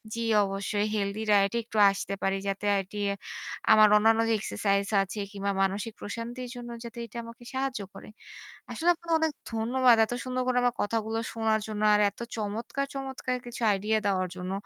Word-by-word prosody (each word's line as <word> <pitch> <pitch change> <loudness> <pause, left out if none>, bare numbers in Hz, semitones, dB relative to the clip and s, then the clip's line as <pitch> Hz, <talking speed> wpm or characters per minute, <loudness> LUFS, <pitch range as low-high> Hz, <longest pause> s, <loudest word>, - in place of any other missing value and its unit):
জি 230 - -3 0.2
অবশ্যই 200 +1 -1
healthy 200 +1 -1
diet 200 -1 +4
এ - - +2
একটু 220 -1 -7
আসতে 195 0 -3
পারি 195 0 +1
যাতে 195 +1 -2 0.2
এটি 195 +2 -10 0.7
আমার 215 0 +8
অন্যান্য 225 +1 +4
যে - - +3
এক্সারসাইজ 200 -1 0 0.2
আছে 195 +2 -4
কিংবা 200 -1 -2
মানসিক 195 +3 -1
প্রশান্তির 240 +4 -5
জন্য 240 0 -7
যাতে 235 0 -9
এটা 230 +1 -11
আমাকে 230 +1 -12
সাহায্য 265 -4 -2
করে। - - -11 0.6
আসলে 340 - 0
আপনাকে 340 0 -8
অনেক 320 0 +1 0.2
ধন্যবাদ। 240 +2 +4
এত 230 - -5
সুন্দর 255 0 -1
করে 250 -1 +1
আমার 245 0 +2
কথাগুলো 225 +1 -1
শোনার 220 -1 +1
জন্য। 215 -1 -4
আর 210 - +4
এত - - -20 0.2
চমৎকার, 225 +6 -3
চমৎকার 265 -2 -3
কিছু 240 0 -8
আইডিয়া 210 +2 +1
দেওয়ার 185 -2 +1
জন্য। 180 0 -5
220 Hz, 175 wpm, -28 LUFS, 200-240 Hz, 0.7 s, আমার